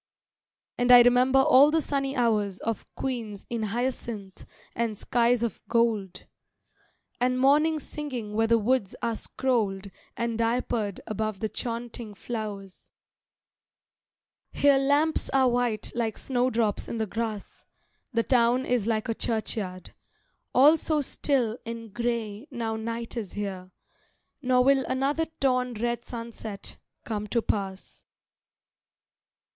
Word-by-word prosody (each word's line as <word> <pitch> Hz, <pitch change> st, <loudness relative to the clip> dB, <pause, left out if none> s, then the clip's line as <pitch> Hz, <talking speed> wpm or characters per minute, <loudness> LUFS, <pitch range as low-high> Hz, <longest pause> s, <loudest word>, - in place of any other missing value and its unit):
And 245 Hz, 0 st, +3 dB
I 245 Hz, -1 st, +10 dB
remember 250 Hz, +2 st, +4 dB
all 270 Hz, +1 st, +7 dB
the 320 Hz, +1 st, +2 dB
sunny 275 Hz, -2 st, -2 dB
hours 210 Hz, -6 st, +1 dB
Of 225 Hz, -2 st, -3 dB
queens 230 Hz, -6 st, -4 dB
in 235 Hz, -1 st, -2 dB
hyacinth 220 Hz, -3 st, -4 dB, 0.3 s
and 225 Hz, -2 st, -1 dB
skies 235 Hz, +1 st, +2 dB
of 235 Hz, -, -3 dB
gold, 225 Hz, -6 st, 0 dB, 0.9 s
And 250 Hz, +1 st, +1 dB
morning 305 Hz, +4 st, +4 dB
singing 260 Hz, -8 st, -6 dB
where 225 Hz, +1 st, +2 dB
the 230 Hz, 0 st, +4 dB
woods 225 Hz, -2 st, 0 dB
are 230 Hz, -1 st, 0 dB
scrolled 210 Hz, -7 st, -1 dB, 0.3 s
And 235 Hz, -1 st, -2 dB
diapered 230 Hz, -3 st, -1 dB
above 215 Hz, -1 st, -3 dB
the 220 Hz, -, -2 dB
chaunting 235 Hz, -2 st, -5 dB
flowers. 205 Hz, -4 st, -6 dB, 1.6 s
Here 280 Hz, -1 st, +4 dB
lamps 290 Hz, +4 st, +2 dB
are 265 Hz, -1 st, +3 dB
white 240 Hz, -3 st, 0 dB
like 230 Hz, -3 st, -2 dB
snowdrops 245 Hz, -5 st, 0 dB
in 230 Hz, -, -4 dB
the 220 Hz, -, 0 dB
grass; 220 Hz, -1 st, -5 dB, 0.4 s
The 230 Hz, -2 st, +1 dB
town 245 Hz, +1 st, +3 dB
is 240 Hz, -4 st, 0 dB
like 220 Hz, -2 st, 0 dB
a 230 Hz, -, 0 dB
churchyard, 215 Hz, -5 st, -2 dB, 0.6 s
all 295 Hz, +5 st, +6 dB
so 310 Hz, -1 st, 0 dB
still 255 Hz, -4 st, +1 dB
And 230 Hz, -2 st, -7 dB
grey 235 Hz, 0 st, -3 dB
now 230 Hz, -5 st, -3 dB
night 230 Hz, +2 st, -4 dB
is 215 Hz, -6 st, -4 dB
here; 190 Hz, -3 st, -5 dB, 0.7 s
nor 250 Hz, -2 st, +3 dB
will 270 Hz, 0 st, +4 dB
Another 275 Hz, +5 st, 0 dB
torn 250 Hz, -2 st, +1 dB
red 235 Hz, +1 st, -2 dB
sunset 230 Hz, -3 st, -7 dB, 0.3 s
come 210 Hz, -2 st, -3 dB
to 230 Hz, +2 st, 0 dB
pass. 195 Hz, -2 st, -4 dB
235 Hz, 125 wpm, -27 LUFS, 215-255 Hz, 1.6 s, I